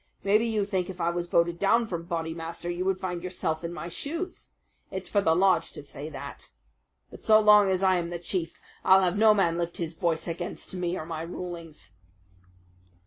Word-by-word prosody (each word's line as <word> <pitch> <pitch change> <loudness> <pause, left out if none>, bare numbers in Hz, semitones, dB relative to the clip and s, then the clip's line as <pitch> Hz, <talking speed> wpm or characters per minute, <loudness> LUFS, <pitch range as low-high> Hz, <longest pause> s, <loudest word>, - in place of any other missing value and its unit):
"Maybe 215 +4 +3
you 215 -3 0
think 190 -3 -1
if 185 -1 -8
I 170 0 +1
was 175 0 -3
voted 170 0 +2
down 230 +4 +3
from 170 -5 -5
Bodymaster 165 0 -4
you 175 +1 -2
would 190 -1 +1
find 180 -2 -3
yourself 175 -3 -3
in 170 - -3
my 170 -1 -6
shoes. 330 - -5 0.4
It's - - -5
for 205 - +2
the 160 -4 +3
lodge 190 +2 +3
to - - -8
say 145 +1 -8
that. 145 - -9 0.6
But - - -12
so 215 0 +6
long 210 -2 +6
as 190 0 0
I 185 -1 +4
am 170 -1 -2
the 175 - -4
chief 170 -1 -3 0.2
I'll 190 0 +6
have 180 0 +1
no 215 0 +6
man 170 -4 +2
lift 170 0 -3
his 170 -1 -3
voice 165 -1 -1
against 175 +2 -5
me 180 -1 -2
or 155 - -5
my 160 -1 -5
rulings." 170 - -8
175 Hz, 200 wpm, -27 LUFS, 170-195 Hz, 0.6 s, so